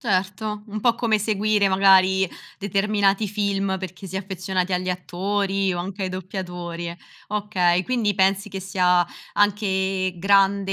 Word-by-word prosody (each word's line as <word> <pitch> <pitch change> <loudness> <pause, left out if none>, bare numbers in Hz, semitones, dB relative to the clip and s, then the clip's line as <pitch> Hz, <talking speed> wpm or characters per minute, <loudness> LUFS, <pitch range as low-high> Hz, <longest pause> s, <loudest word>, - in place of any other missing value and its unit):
Certo. 210 -1 -1
Un 215 0 -5
po' 235 0 +3
come 220 -3 +1
seguire, 210 -1 +1
magari, 190 -1 +4 0.3
determinati 200 +1 +1
film 200 -2 -1
perché 185 +1 -8
si 190 +1 -6
è - - +1
affezionati 185 -1 -2
agli 185 0 -1
attori, 195 +1 -1
o 175 - -3
anche 190 +2 -5
ai 185 - -1
doppiatori. 175 -2 -5 0.3
Okay. 190 -4 +1
Quindi, 230 -5 0
pensi 195 +2 +1
che 195 0 -5
sia 180 -2 +2 0.3
anche 190 -2 +1
grande 195 +1 +3
195 Hz, 140 wpm, -23 LUFS, 185-205 Hz, 0.3 s, magari